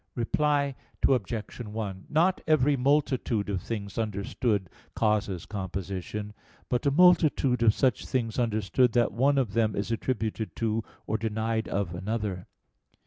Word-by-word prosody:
Reply 140 +3 +1 0.3
Obj. 115 -4 -1
1: 105 -4 -5
Not 175 +5 +2
every 145 -2 +4
multitude 130 -6 +1
of 95 -3 -2
things 100 -1 -5
understood 105 -1 -1 0.3
causes 105 -5 0
composition, 100 +1 -5 0.4
but 125 +4 0
a - - +6
multitude 155 -6 +4
of 110 -2 +5
such 130 -5 +1
things 115 -2 -1
understood 115 +1 +2
that 120 -2 +3
one 135 +5 +3
of 120 -7 0
them 110 -2 +1
is 100 +3 -2
attributed 110 -2 -2
to, 115 -1 -1 0.2
or 110 - -1
denied 110 +1 -1
of, 100 -3 -2
another. 100 0 -3
115 Hz, 135 wpm, -28 LUFS, 105-130 Hz, 0.4 s, a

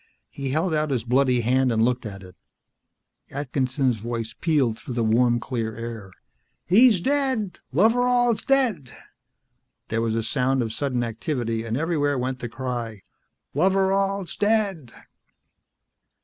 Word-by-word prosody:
He 140 -1 -4
held 160 +5 0
out 155 0 0
his 125 -5 -1
bloody 125 0 +2
hand 130 +2 +2
and 110 0 +3
looked 125 -1 -1
at 95 -2 -9
it. 90 0 -13 0.9
Atkinson's 130 -2 -1
voice 115 0 -4
pealed 140 -9 0
through 125 - -7
the 120 - +1
warm 120 +2 +3
clear 115 -3 -3
air. 115 -4 -7 0.6
"He's 215 +2 +6
dead! 265 - 0
Loveral's 240 - +3
dead!" 235 - 0 0.9
There 115 0 0
was 115 -1 0
a 115 - 0
sound 130 +2 +1
of 110 -1 -4
sudden 130 -3 -1
activity, 115 -1 -2
and 115 +1 -2
everywhere 145 -3 0
went 130 +1 -2
the 120 - -5
cry, 120 -4 -5 0.5
"Loveral's 195 -1 +1
dead!" 205 - 0
130 Hz, 135 wpm, -24 LUFS, 115-180 Hz, 0.9 s, He's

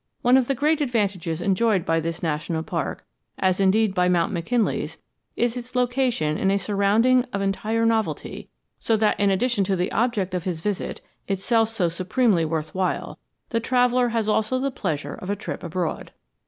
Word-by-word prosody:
One 245 +1 +5
of 260 -2 +3
the 275 - +1
great 300 +4 +1
advantages 195 - -1
enjoyed 195 0 +2
by 165 0 +2
this 165 +1 -4
national 160 +1 -2
park, - - -4 0.3
as 185 0 +1
indeed 195 +2 +3
by 180 -1 +2
Mount 175 +3 +1
McKinley's, 220 +6 -1 0.4
is 240 0 0
its 250 0 -8
location 245 - +1
in 195 - +2
a 195 - +3
surrounding 210 +6 +3
of 200 - -2
entire 215 +4 0
novelty, 225 -1 -1 0.3
so 225 - +1
that 215 0 +1
in 200 -1 +3
addition 205 +2 +1
to 195 - +1
the 180 0 -1
object 220 -6 0
of 180 -2 -2
his 175 -3 -3
visit, 200 +3 -3 0.3
itself 220 +3 +1
so 215 -6 0
supremely 185 +2 +1
worth 155 -1 -3
while, 185 -1 -2 0.3
the 230 - 0
traveller 245 +1 +2
has 225 -2 -1
also 220 +3 +1
the 275 +1 -1
pleasure 160 - -3
of 185 - -8
a 205 - +1
trip 205 - -6
abroad. 170 -1 -3
205 Hz, 180 wpm, -24 LUFS, 180-235 Hz, 0.4 s, One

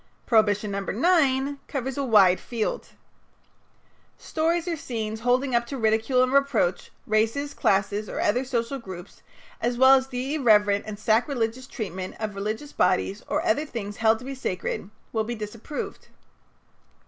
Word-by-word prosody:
Prohibition 210 -3 +2
No. 200 - -2
9 275 - +2
covers 265 -1 -3
a 280 - -1
wide 200 -7 +5
field: 230 -3 -3 1.3
"Stories 330 +2 -1
or 340 - 0
scenes 220 -6 -4
holding 250 +2 +1
up 235 0 +2
to 275 - -5
ridicule 225 +3 +2
and 255 +1 0
reproach 275 -10 +1 0.2
races, 225 +7 0
classes, 200 +2 0
or - - -4
other 245 +5 +1
social 250 +1 -2
groups, 185 -6 -10 0.4
as 240 0 0
well 260 +1 +7
as 265 0 +3
the 260 +2 -3
irreverent 210 -8 +3
and 210 -1 -5
sacrilegious 230 +3 0
treatment 190 -7 -5
of 215 -2 -3
religious 215 +9 -4
bodies 190 +3 +1
or 300 - -1
other 325 -3 +2
things 215 -8 -6
held 220 0 +3
to 250 - -12
be 275 - -5
sacred, 195 -6 -4 0.2
will 220 -1 +1
be 240 +2 -4
disapproved." 215 +6 -6
235 Hz, 150 wpm, -25 LUFS, 210-270 Hz, 1.3 s, well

